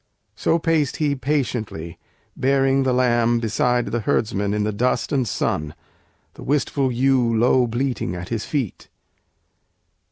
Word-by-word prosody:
So 165 - +1
paced 160 -4 0
he 150 -2 +1
patiently, 120 - -3 0.4
bearing 135 0 +2
the 130 -1 +1
lamb 120 -2 +2
Beside 120 +2 +1
the 120 - 0
herdsmen 105 -1 0
in 105 0 0
the 105 - 0
dust 120 +5 0
and 130 -5 +1
sun, 75 -5 -2 0.6
The - - -13
wistful 140 -1 0
ewe 125 -2 +2
low 125 +2 +3
bleating 120 -6 -2
at 90 +1 -7
his 115 -2 -2
feet. 135 - -3
125 Hz, 135 wpm, -22 LUFS, 110-135 Hz, 0.6 s, low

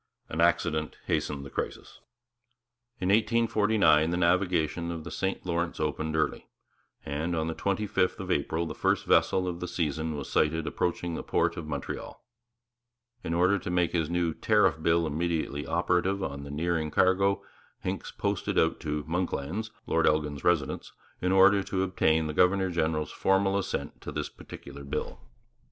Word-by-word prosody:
An 80 - -1
accident 80 -2 +1
hastened 70 -2 -1
the 70 - -9
crisis. - - -5 1.0
In 90 - -1
1849 105 -7 +3
the 85 - 0
navigation 85 -2 +1
of 85 -2 -5
the - - -8
St 95 -1 -2
Lawrence 85 -1 -1
opened 80 +1 -1
early; 80 -2 -1 0.6
and 80 +5 -2
on 80 -1 0
the 80 - -2
twenty 100 +4 -1
fifth 95 -2 0
of - - -4
April 80 +1 0
the 80 - -5
first - - +1
vessel 95 -1 +3
of 85 -1 -3
the 90 - -4
season 80 -2 -2
was 70 -2 -5
sighted 80 +1 +1
approaching 85 0 -1
the - - -3
port - - +1
of 80 - -6
Montreal. 70 -2 -5 1.0
In 85 - -2
order 95 +3 +3
to - - -6
make 90 -1 +1
his 80 -3 0
new 85 -1 0
Tariff 105 -6 +2
Bill 85 +1 +3
immediately 80 -2 -2
operative 90 +3 +1
on 70 -3 -4
the - - -8
nearing 80 +1 -1
cargo, 95 +4 +2 0.4
Hincks - - -3
posted - - -2
out 80 - +2
to 75 -1 -3
'Monklands,' 90 +4 -2 0.2
Lord 80 0 +2
Elgin's 75 -2 0
residence, 80 -6 0 0.3
in 90 - +1
order 100 +1 +6
to 95 0 -1
obtain 80 -4 +2
the 75 - -3
governor 95 +2 +3
general's 80 -2 0
formal 95 0 +2
assent 100 - -3
to - - -6
this - - -3
particular 70 - -11
bill. 70 - -4
85 Hz, 165 wpm, -28 LUFS, 80-95 Hz, 1.0 s, order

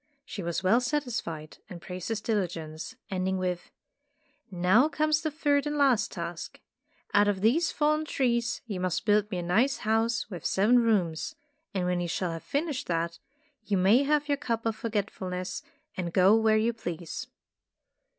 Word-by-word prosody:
She 205 - -6
was 170 +1 -2
well 220 +7 +4
satisfied, 240 - -3
and 180 -3 -8
praised 180 0 -7
his 225 -2 -2
diligence, 175 -3 -3 0.2
ending 190 0 0
with, 180 -1 -3 0.8
"Now 190 - +4
comes 310 +1 +1
the 310 - -1
third 290 -1 +1
and 295 0 -2
last 270 -6 +3
task. - - -6 0.5
Out 205 0 +5
of 200 -2 0
these 295 - +3
fallen 305 +1 +1
trees 235 -5 0
you 205 -5 -4
must 180 -2 -1
build 210 -1 +3
me 190 - -3
a 175 - -2
nice 225 +11 +2
house 225 +1 +1
with 180 -7 -8
seven 220 +6 +4
rooms, 195 -9 +1 0.4
and 185 -2 0
when 180 0 0
you 175 - -2
shall 175 +1 -1
have 165 0 -5
finished 290 -2 -2
that, 170 0 -1 0.4
you 205 -3 0
may 195 +8 +5
have 295 +1 +1
your 285 -1 +1
cup 230 -5 -2
of 225 -1 0
Forgetful 210 -3 -3
ness 180 0 -4 0.3
and 175 -2 -3
go 190 +4 +5
where 220 -1 +4
you 225 +2 +2
please." 175 -7 -5
210 Hz, 170 wpm, -28 LUFS, 180-250 Hz, 0.8 s, Out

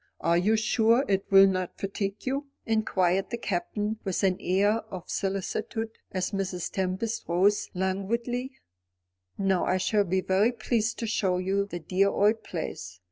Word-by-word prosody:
Are 170 - +2
you 215 +5 +3
sure 225 +4 +3
it 195 0 0
will 195 0 +8
not 185 -2 -1
fatigue 195 +1 -3
you?" 275 +2 -2 0.2
inquired 195 -4 +1
the 235 - -3
Captain, 210 +1 -2
with 190 0 -2
an 185 -1 +3
air 205 +4 +2
of 185 -3 -7
solicitude, 215 +3 -2 0.2
as 185 -1 -2
Mrs. 190 -3 -3
Tempest 190 +5 -2
rose 190 +4 +2
languidly. 230 +7 -1 0.9
"No; 195 -2 +1
I 185 - +1
shall 205 +2 +2
be 185 +1 0
very 195 +6 +2
pleased 230 -1 -1
to 230 - -3
show 195 -4 +1
you 195 +2 0
the 175 - -5
dear 190 +5 +2
old 210 +3 +2
place. 95 - -6
195 Hz, 155 wpm, -27 LUFS, 185-220 Hz, 0.9 s, will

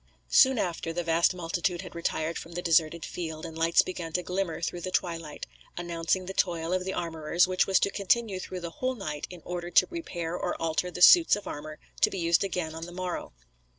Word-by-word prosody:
Soon 260 -1 +6
after 170 -4 -2
the 175 +1 -2
vast 165 +2 +2
multitude 175 +1 -2
had - - -10
retired 165 -1 -2
from 170 - -10
the 175 - -3
deserted 165 0 +2
field 160 -2 -5
and 165 -1 -8
lights 165 +1 +4
began 175 -3 -5
to 180 - 0
glimmer 180 -1 -2
through 175 +1 -3
the 185 - -3
twilight, 165 -4 -3 0.3
announcing 175 +1 -1
the 190 - -5
toil 170 -3 0
of 185 0 0
the 190 - -2
armourers, 165 0 +1
which 185 0 +1
was 190 -1 +4
to 200 - +2
continue 200 0 +1
through 185 0 -6
the 170 -1 -5
whole 255 +7 -2
night 155 -9 -5
in 180 -3 -11
order 175 -1 -4
to - - +5
repair 175 - -4
or 180 - -3
alter 165 +2 0
the 180 0 0
suits 345 - +8
of 205 - -8
armour 155 +1 -7 0.2
to - - +6
be - - -5
used 170 0 +3
again 180 -4 -2
on 165 +1 -6
the - - -9
morrow. 180 0 -4
175 Hz, 220 wpm, -28 LUFS, 165-185 Hz, 0.3 s, suits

